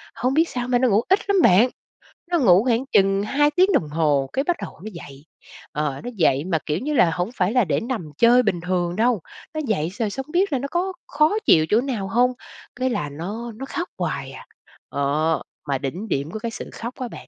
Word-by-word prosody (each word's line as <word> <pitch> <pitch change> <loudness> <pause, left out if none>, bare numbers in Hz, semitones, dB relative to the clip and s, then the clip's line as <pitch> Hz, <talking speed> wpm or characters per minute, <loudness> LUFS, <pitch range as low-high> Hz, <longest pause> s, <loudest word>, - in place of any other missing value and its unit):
hông 255 +2 0
biết 325 +3 +3
sao 245 -1 -3
mà 250 -1 +2
nó 255 0 +3
ngủ 210 +1 +3
ít 385 +2 +5
lắm 395 -2 +4
bạn, 215 - +5 0.6
nó 345 - +3
ngủ 190 - +5
khoảng 245 +1 +1
chừng 195 0 +3
2 290 +7 +2
tiếng 370 +6 +3
đồng 155 - +1
hồ 145 -3 +1
cái 270 - +1
bắt 350 +3 0
đầu - - -8
nó 215 - -5
dậy. 145 -4 -11 0.5
Ờ, 150 -2 -2
nó 245 - -4
dậy 150 -6 +2
mà, 170 -4 0
kiểu 155 +2 -1
như 300 +7 -2
là, 180 - +4
hổng 180 +3 -2
phải 180 -1 +1
là 250 -4 +3
để 160 - 0
nằm 230 - -4
chơi 240 +2 +5
bình 195 -6 0
thường 175 0 -1
đâu, 225 -1 +2 0.3
nó 310 - -2
dậy 170 -8 0
rồi 225 -3 0
xong 265 +6 -5
hông - - -13
biết 365 0 +1
là 265 - +1
nó 275 - -3
có 370 +2 -1
khó 305 +8 +2
chịu 155 -1 +5
chỗ 220 +3 +4
nào 240 -8 -3
hông? 245 +5 +2 0.4
Cái 255 +1 0
là 150 -11 -2
nó 200 +11 -6
nó 265 +5 -6
khóc 345 +6 -4
hoài - - -3
à. - - -11 0.4
Ờ, 150 +3 0 0.3
mà 140 -1 0
đỉnh 150 +11 -5
điểm 145 -4 -2
của 220 - -5
cái 230 +1 -4
sự - - -7
khóc 235 +2 -6
á 255 - -3
bạn, - - -11
220 Hz, 240 wpm, -22 LUFS, 165-260 Hz, 0.6 s, ít